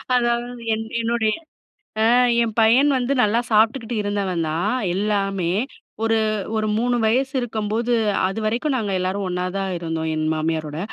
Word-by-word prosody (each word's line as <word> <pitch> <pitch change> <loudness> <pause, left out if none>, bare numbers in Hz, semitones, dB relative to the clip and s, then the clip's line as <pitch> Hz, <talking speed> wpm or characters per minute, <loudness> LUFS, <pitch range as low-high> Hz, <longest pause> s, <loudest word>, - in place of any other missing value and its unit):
அதாவது, 240 0 0 0.2
என் 225 0 -5 0.2
என்னுடைய, 225 -2 +1 0.7
ஆ, - - +4 0.4
என் 220 -2 -4
பையன் 250 +6 +5
வந்து 250 +2 -1
நல்லா 220 +3 +2
சாப்ட்டுக்கிட்டு 225 +2 +2
இருந்தவன்தா 185 -6 -1 0.4
எல்லாமே. 195 -4 0 0.5
ஒரு, 225 0 +2 0.4
ஒரு 215 0 0
3 245 +1 +1
வயசு 260 +5 +1
இருக்கம்போது, 225 0 -2 0.4
அதுவரைக்கு 220 +8 -1
நாங்க 210 -4 -2
எல்லாரும் 190 +2 -2
ஒண்ணாதா 180 +2 -2
இருந்தோம், 160 -1 -3
என் 155 0 -1
மாமியாரோட. 155 -1 -2
215 Hz, 125 wpm, -22 LUFS, 185-235 Hz, 0.7 s, பையன்